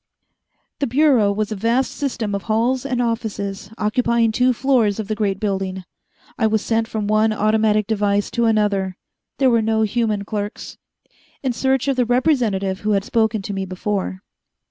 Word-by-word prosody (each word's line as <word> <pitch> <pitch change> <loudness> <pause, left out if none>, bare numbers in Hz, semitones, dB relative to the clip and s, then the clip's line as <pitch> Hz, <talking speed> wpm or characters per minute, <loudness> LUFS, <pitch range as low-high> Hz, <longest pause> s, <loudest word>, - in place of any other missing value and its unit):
The 280 - 0
Bureau 255 -5 +3
was 210 +1 -2
a - - -2
vast 230 +6 +1
system 235 -7 -3
of 200 - -2
halls 245 +5 +1
and 250 -2 0
offices, 205 -4 -3
occupying 230 +1 +1
two 250 +3 +3
floors 240 -5 +1
of 215 - -4
the 215 - -1
great 205 -2 -1
building. 190 -2 -2 0.6
I 220 - +3
was 220 -1 0
sent 225 0 +1
from 215 -2 -3
one 215 +1 +2
automatic 215 0 +2
device 205 -1 0
to 235 -1 +1
another 205 -4 +1 0.4
there 265 -2 +3
were 230 -1 +3
no 220 0 +1
human 215 -2 0
clerks 205 0 -5 0.6
in 260 -2 0
search 265 +2 0
of 275 -2 +1
the 250 - +3
representative 230 -7 +1
who 215 0 0
had 195 -1 +1
spoken 220 -3 0
to 200 - -4
me 195 0 -2
before. 190 +1 -3
220 Hz, 170 wpm, -20 LUFS, 205-235 Hz, 0.6 s, Bureau